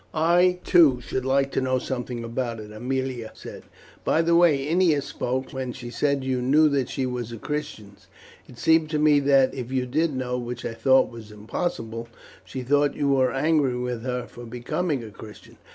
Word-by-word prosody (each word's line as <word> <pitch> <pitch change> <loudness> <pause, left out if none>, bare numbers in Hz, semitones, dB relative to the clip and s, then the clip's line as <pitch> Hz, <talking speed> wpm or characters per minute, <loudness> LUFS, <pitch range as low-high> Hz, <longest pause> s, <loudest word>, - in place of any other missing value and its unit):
"I, 175 +3 +3
too, 155 -8 +5
should 130 +2 -4
like 135 +1 +1
to - - 0
know 130 0 +1
something 125 -2 -4
about 115 0 -3
it," 105 0 -9
Aemilia 125 +1 -3
said. - - -10 0.4
"By 165 - +2
the 170 0 +3
way 155 -5 +4
Ennia 165 -2 +3
spoke, 130 -1 -3
when 130 -2 -4
she 120 -2 -8
said 140 +2 0
you 130 -1 -1
knew 150 +5 +4
that 135 -3 0
she 135 - -2
was 125 -2 -4
a 115 - -6
Christian, 130 -7 -5 0.5
it 125 - -14
seemed 160 +2 +3
to 155 - -1
me 150 -1 +4
that, 135 -2 +3
if 125 -1 -6
you 130 -1 0
did 150 +4 0
know, 125 -1 -2
which 120 0 -6
I - - -3
thought 130 +4 +3
was 115 -2 -11
impossible, 115 - -4 0.4
she 130 - -6
thought 145 +2 +2
you 145 -1 0
were 130 -2 +3
angry 140 -2 +1
with 125 -2 -3
her 125 0 -3
for 120 - -12
becoming 125 +5 -3
a 110 - -9
Christian." 105 +1 -13
130 Hz, 195 wpm, -24 LUFS, 120-145 Hz, 0.5 s, too